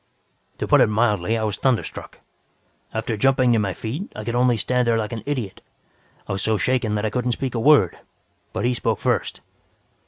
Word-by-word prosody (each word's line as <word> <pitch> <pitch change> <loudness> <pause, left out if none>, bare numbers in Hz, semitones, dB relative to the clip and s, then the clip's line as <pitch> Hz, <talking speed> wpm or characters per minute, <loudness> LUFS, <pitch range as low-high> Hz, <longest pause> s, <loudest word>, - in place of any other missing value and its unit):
"To - - -3
put - - +5
it - - +6
mildly, 105 -1 +1
I 110 - -2
was 105 -1 -1
thunderstruck. 130 -4 -2 0.7
After 110 0 -2
jumping 130 +1 +3
to 115 - +3
my 100 -3 -1
feet, 140 - -5
I 105 - -6
could 115 - -3
only 120 -1 +3
stand 125 +3 0
there 115 -1 +3
like 110 -1 -2
an 115 - -4
idiot. 125 -9 -3 0.7
I - - -5
was 95 0 -2
so 110 +1 +1
shaken 115 0 0
that 105 +1 -1
I 110 - -1
couldn't 125 0 0
speak 130 +1 -3
a 120 - -1
word. 135 - +4 0.5
But - - -2
he 125 - +2
spoke 115 -3 -1
first. 120 -6 -1
115 Hz, 205 wpm, -22 LUFS, 105-125 Hz, 0.7 s, it